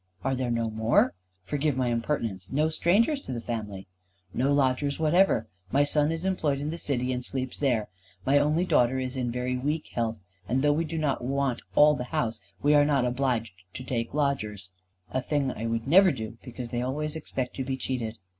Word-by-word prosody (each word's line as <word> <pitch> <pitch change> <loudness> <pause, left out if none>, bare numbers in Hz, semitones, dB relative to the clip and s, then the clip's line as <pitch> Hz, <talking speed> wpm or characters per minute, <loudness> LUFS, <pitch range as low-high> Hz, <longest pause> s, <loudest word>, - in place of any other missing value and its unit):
"Are 135 - +1
there 130 -1 -1
no 115 -1 0
more? 110 -2 +3 0.3
Forgive 145 +5 -1
my 125 -2 +1
impertinence. 115 -6 -2
No 150 +3 +2
strangers 205 - +2
to 275 - -8
the 120 - -3
family?" 105 -5 -5 0.5
"No 135 +3 +1
lodgers 140 0 +2
whatever. 160 - +3 0.3
My 140 +2 +4
son 145 +1 +2
is 165 +2 -3
employed 155 -7 0
in 145 +2 -3
the 170 - -5
City, 130 -4 -1
and 125 0 -3
sleeps 130 0 -2
there. 120 -7 +1 0.4
My 140 +2 +5
only 150 +5 +2
daughter 125 -6 +3
is 130 0 -3
in 125 -2 -1
very 125 +1 -2
weak 150 +5 -2
health, 115 -4 -2 0.3
and 130 +3 +1
though 145 0 +4
we 165 +3 0
do 165 +1 -4
not 150 -5 0
want 135 -1 0
all 150 0 +7
the 125 -4 -3
house, 115 -2 -2 0.2
we 145 +1 +5
are 145 -1 +6
not 140 -3 +2
obliged 120 -4 0 0.2
to 130 - -5
take 120 0 -3
lodgers. 110 -10 -1 0.4
A 130 - 0
thing 140 -1 0
I 115 - -5
never 130 - +4
would 180 - +2
do, 110 +1 -7
because 125 -1 -7
they 120 0 -2
always 150 +4 -2
expect 130 -5 -4
to 135 - -1
be 130 0 -3
cheated." 120 -4 -3
130 Hz, 200 wpm, -27 LUFS, 120-150 Hz, 0.5 s, all